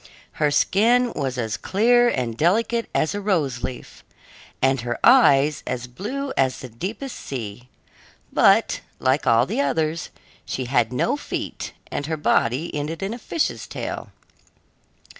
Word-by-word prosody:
Her 150 Hz, -1 st, +1 dB
skin 235 Hz, +10 st, +3 dB
was 135 Hz, -4 st, -3 dB
as 110 Hz, -2 st, -2 dB
clear 240 Hz, +4 st, +3 dB
and 120 Hz, -, -2 dB
delicate 225 Hz, -, +1 dB
as 155 Hz, -, 0 dB
a 205 Hz, -, -3 dB
rose 155 Hz, -, 0 dB
leaf, 125 Hz, -, -7 dB, 0.6 s
and 135 Hz, -1 st, +2 dB
her 120 Hz, 0 st, -3 dB
eyes 150 Hz, -, +5 dB
as 125 Hz, -1 st, -3 dB
blue 255 Hz, -, -5 dB
as 130 Hz, -1 st, +1 dB
the 130 Hz, -, -8 dB
deepest 205 Hz, -, -5 dB
sea; 120 Hz, -1 st, -7 dB, 0.6 s
but, -, -, +4 dB, 0.2 s
like 130 Hz, +1 st, +1 dB
all 115 Hz, 0 st, +5 dB
the 140 Hz, -, -1 dB
others, 155 Hz, +4 st, -1 dB, 0.3 s
she 130 Hz, -, -4 dB
had 120 Hz, -2 st, +1 dB
no 125 Hz, -, +1 dB
feet -, -, -5 dB, 0.2 s
and 145 Hz, -, -3 dB
her 160 Hz, 0 st, -2 dB
body 145 Hz, +1 st, +1 dB
ended 150 Hz, +5 st, -3 dB
in 195 Hz, +3 st, -2 dB
a 240 Hz, -, -7 dB
fish's 320 Hz, +7 st, -2 dB
tail. -, -, -5 dB
145 Hz, 145 wpm, -23 LUFS, 125-205 Hz, 0.6 s, eyes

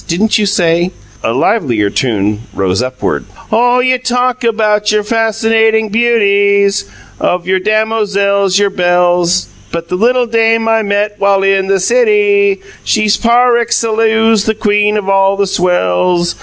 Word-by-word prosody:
"Didn't 210 Hz, +7 st, 0 dB
you 210 Hz, -, 0 dB
say 175 Hz, -3 st, +1 dB, 0.2 s
" -, -, -27 dB
A -, -, 0 dB
livelier 120 Hz, -, 0 dB
tune 105 Hz, -4 st, -1 dB
rose 95 Hz, +2 st, -1 dB
upward. 130 Hz, 0 st, -3 dB, 0.3 s
"Oh, 245 Hz, +2 st, +2 dB
you 255 Hz, 0 st, +1 dB
talk 250 Hz, 0 st, -1 dB
about 215 Hz, -2 st, 0 dB
your 210 Hz, 0 st, 0 dB
fascinating 225 Hz, 0 st, 0 dB
beauties, 200 Hz, -, +1 dB, 0.3 s
Of 180 Hz, -1 st, -1 dB
your 190 Hz, +1 st, 0 dB
dem 215 Hz, +3 st, 0 dB
O 225 Hz, -1 st, 0 dB
zells, 200 Hz, -1 st, 0 dB
your 200 Hz, -1 st, +1 dB
belles, 175 Hz, -1 st, +1 dB, 0.2 s
But 170 Hz, 0 st, -5 dB
the 180 Hz, -, -2 dB
littil 245 Hz, +4 st, +1 dB
dame 225 Hz, 0 st, +1 dB
I 225 Hz, 0 st, +2 dB
met, 205 Hz, 0 st, -2 dB
while 200 Hz, -1 st, +1 dB
in 195 Hz, -1 st, +1 dB
the 195 Hz, 0 st, +1 dB
city, 410 Hz, -, +2 dB, 0.2 s
She's 215 Hz, -1 st, +1 dB
par 240 Hz, +1 st, +2 dB
excellaws 225 Hz, -2 st, +1 dB
the 220 Hz, -, -1 dB
queen 210 Hz, -1 st, +1 dB
of 205 Hz, -2 st, -4 dB
all 195 Hz, 0 st, +2 dB
the 200 Hz, -, +1 dB
swells. 175 Hz, -, 0 dB
205 Hz, 155 wpm, -12 LUFS, 185-225 Hz, 0.3 s, Oh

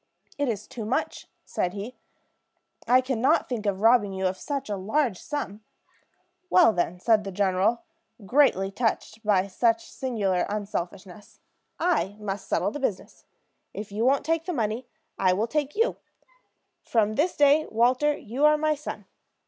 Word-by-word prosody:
"It 285 Hz, -3 st, +1 dB
is 215 Hz, -2 st, -3 dB
too 230 Hz, -, -7 dB
much," 220 Hz, +5 st, -2 dB, 0.2 s
said 180 Hz, 0 st, -2 dB
he; 210 Hz, +5 st, -6 dB, 0.9 s
"I 255 Hz, +1 st, +5 dB
can 255 Hz, -3 st, -2 dB
not 260 Hz, -, +3 dB
think 225 Hz, -4 st, -3 dB
of 195 Hz, -1 st, -1 dB
robbing 225 Hz, -3 st, +4 dB
you 190 Hz, 0 st, -2 dB
of 185 Hz, 0 st, +1 dB
such 280 Hz, +8 st, -4 dB
a 205 Hz, -, -2 dB
large 215 Hz, +2 st, 0 dB
sum." 220 Hz, -8 st, -5 dB, 0.9 s
"Well, 350 Hz, -11 st, +6 dB
then," 175 Hz, -1 st, -1 dB
said 220 Hz, +2 st, +3 dB
the 195 Hz, -, -5 dB
general, 195 Hz, +4 st, +1 dB, 0.4 s
greatly 195 Hz, -6 st, +3 dB
touched 225 Hz, 0 st, -2 dB
by 200 Hz, -3 st, +3 dB
such 230 Hz, +4 st, 0 dB
singular 205 Hz, -8 st, -1 dB
unselfishness, 200 Hz, -1 st, -6 dB, 0.4 s
"I 325 Hz, -, +1 dB
must 200 Hz, -2 st, -5 dB
settle -, -, 0 dB
the 290 Hz, -, -6 dB
business. 220 Hz, -8 st, -4 dB, 0.5 s
If 205 Hz, 0 st, -6 dB
you 210 Hz, +3 st, -2 dB
won't 270 Hz, +3 st, +2 dB
take 325 Hz, +1 st, 0 dB
the 360 Hz, -, -2 dB
money, 230 Hz, -1 st, -2 dB, 0.3 s
I 185 Hz, -1 st, +4 dB
will 205 Hz, +4 st, 0 dB
take 295 Hz, +3 st, -2 dB
you. 455 Hz, +3 st, +1 dB, 0.8 s
From 215 Hz, -2 st, +1 dB
this 315 Hz, +10 st, 0 dB
day, 290 Hz, +2 st, +4 dB
Walter, 255 Hz, +6 st, +2 dB
you 245 Hz, +7 st, -4 dB
are 300 Hz, 0 st, +6 dB
my 310 Hz, 0 st, +1 dB
son. 300 Hz, 0 st, -7 dB
225 Hz, 160 wpm, -26 LUFS, 200-275 Hz, 0.9 s, Well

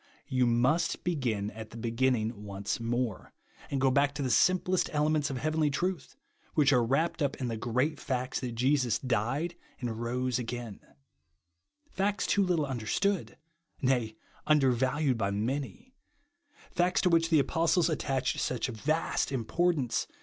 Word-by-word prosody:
You 130 Hz, -1 st, +1 dB
must 125 Hz, +8 st, +1 dB
begin 120 Hz, -, -1 dB
at 110 Hz, 0 st, -9 dB
the 115 Hz, -, -10 dB
beginning 115 Hz, -2 st, 0 dB
once 100 Hz, +1 st, -3 dB
more; 115 Hz, -2 st, -2 dB, 0.4 s
and 140 Hz, -, -1 dB
go 135 Hz, 0 st, +3 dB
back 140 Hz, +1 st, +2 dB
to 145 Hz, -, -2 dB
the 130 Hz, -, 0 dB
simplest 185 Hz, -, +3 dB
elements 150 Hz, 0 st, +1 dB
of 135 Hz, -, -3 dB
heavenly 155 Hz, +3 st, +1 dB
truths 175 Hz, +2 st, -2 dB, 0.4 s
which 145 Hz, -3 st, +4 dB
are 125 Hz, -2 st, +4 dB
wrapped 140 Hz, +9 st, 0 dB
up 140 Hz, -1 st, +1 dB
in 125 Hz, -3 st, -3 dB
the 115 Hz, -, -2 dB
great 125 Hz, +7 st, -1 dB
facts 130 Hz, -1 st, -2 dB
that 125 Hz, -3 st, -5 dB
Jesus 130 Hz, -1 st, +2 dB
died 130 Hz, +7 st, -1 dB, 0.3 s
and 115 Hz, -2 st, -4 dB
rose 125 Hz, +1 st, -1 dB
again; 120 Hz, -3 st, -5 dB, 1.1 s
facts 205 Hz, +2 st, 0 dB
too 205 Hz, -, +2 dB
little 175 Hz, -5 st, +1 dB
understood, 140 Hz, -, -1 dB, 0.4 s
nay, 125 Hz, -4 st, +1 dB, 0.3 s
un 155 Hz, 0 st, +5 dB
dervalued 130 Hz, 0 st, +1 dB
by 100 Hz, -, +1 dB
many; 130 Hz, -, -3 dB, 0.8 s
facts 180 Hz, +1 st, +2 dB
to 185 Hz, -, +3 dB
which 165 Hz, 0 st, +3 dB
the 160 Hz, -, +4 dB
apostles 165 Hz, +4 st, +2 dB
attached 135 Hz, -5 st, -1 dB
such 125 Hz, 0 st, -1 dB
vast 140 Hz, +7 st, -1 dB
importance 135 Hz, +2 st, 0 dB
130 Hz, 150 wpm, -30 LUFS, 120-155 Hz, 1.1 s, un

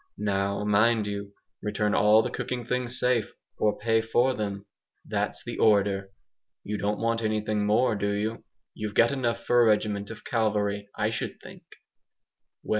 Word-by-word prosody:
Now, 100 Hz, 0 st, -1 dB
mind 105 Hz, +2 st, +3 dB
you, 100 Hz, 0 st, -5 dB, 0.3 s
return 105 Hz, 0 st, -1 dB
all 105 Hz, +2 st, +5 dB
the 125 Hz, -, -3 dB
cooking 125 Hz, 0 st, -4 dB
things 125 Hz, 0 st, -1 dB
safe, 125 Hz, -4 st, +1 dB, 0.3 s
or 105 Hz, -1 st, +1 dB
PAY 115 Hz, +1 st, +2 dB
FOR 120 Hz, +3 st, +2 dB
THEM 100 Hz, -3 st, -4 dB, 0.4 s
that's -, -, -2 dB
the -, -, -6 dB
order! 100 Hz, -2 st, +3 dB, 0.5 s
You 105 Hz, 0 st, -4 dB
don't 105 Hz, +1 st, -1 dB
want 115 Hz, 0 st, 0 dB
anything 105 Hz, -1 st, 0 dB
more, 110 Hz, +2 st, +3 dB
do 100 Hz, 0 st, -1 dB
you? 110 Hz, +3 st, -2 dB, 0.3 s
You've 105 Hz, -1 st, -5 dB
got 115 Hz, +2 st, +5 dB
enough 120 Hz, -4 st, -1 dB
for 120 Hz, 0 st, +4 dB
a -, -, +5 dB
regiment 105 Hz, -1 st, +1 dB
of 115 Hz, 0 st, -10 dB
cavalry, 105 Hz, -4 st, 0 dB
I 110 Hz, 0 st, 0 dB
should 115 Hz, -, -4 dB
think." -, -, -12 dB
105 Hz, 160 wpm, -27 LUFS, 105-115 Hz, 0.5 s, all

